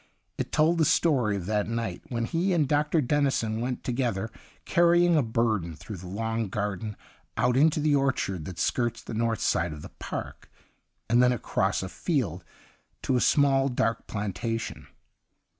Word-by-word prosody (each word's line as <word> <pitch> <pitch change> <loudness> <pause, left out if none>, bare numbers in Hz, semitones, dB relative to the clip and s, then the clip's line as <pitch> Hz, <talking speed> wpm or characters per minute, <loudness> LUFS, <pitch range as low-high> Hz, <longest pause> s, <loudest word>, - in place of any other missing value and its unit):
It - - -3
told 160 +2 +3
the 160 - +4
story 130 -11 +2
of 95 -3 -4
that 105 +1 0
night 115 -6 -3
when 115 -2 -1
he 175 +8 0
and 155 -5 +2
Dr. 150 +3 +2
Dennison 125 -5 0
went 125 +1 -3
together 120 -4 -1 0.3
carrying 175 -1 +4
a 155 - +4
burden 110 - 0
through 90 +7 -8
the 90 +1 -9
long 115 +3 -2
garden 105 +1 -3 0.4
out 125 0 +2
into 155 +3 +4
the 150 -1 +3
orchard 130 - 0
that 90 0 -7
skirts 120 -2 -1
the - - -7
north 115 0 0
side 85 -1 +1
of 75 - -9
the - - -8
park, - - -6 0.6
and 120 +2 +4
then 125 0 +5
across 120 -4 0
a - - -3
field 100 - -2 0.6
to 130 - +1
a 125 - +2
small, 135 -2 +3
dark 115 -2 -1
plantation. 110 +3 -4
115 Hz, 165 wpm, -27 LUFS, 105-140 Hz, 0.6 s, then